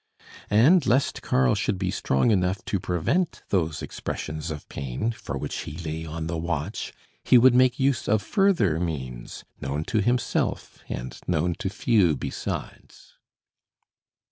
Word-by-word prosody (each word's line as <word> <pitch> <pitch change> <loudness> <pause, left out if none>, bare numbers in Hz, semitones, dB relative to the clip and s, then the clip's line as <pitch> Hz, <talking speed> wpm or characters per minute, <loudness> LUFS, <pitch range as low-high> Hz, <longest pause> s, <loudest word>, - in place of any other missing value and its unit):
And 140 - +5
lest 130 +3 +2
Karl 65 -1 +2
should - - 0
be 95 -1 -1
strong 65 - +1
enough 95 -1 +1
to 100 - -1
prevent 95 - -1
those 80 -6 0
expressions 80 +1 -5
of 75 -2 -6
pain 70 - -3
for 70 -11 -6
which - - -4
he - - -6
lay 80 -1 -5
on 80 +1 -4
the 80 0 -3
watch, 85 +3 -3 0.3
he 125 - +6
would 125 +1 +7
make 125 0 +4
use 135 -2 +1
of 110 -1 +2
further 170 - +2
means, 65 -8 -5 0.2
known 70 +3 -2
to 110 +5 0
himself, 120 +2 -1
and - - -5
known 85 0 +1
to 95 - -2
few 100 -6 +3
besides. - - -6
90 Hz, 145 wpm, -25 LUFS, 75-115 Hz, 0.3 s, would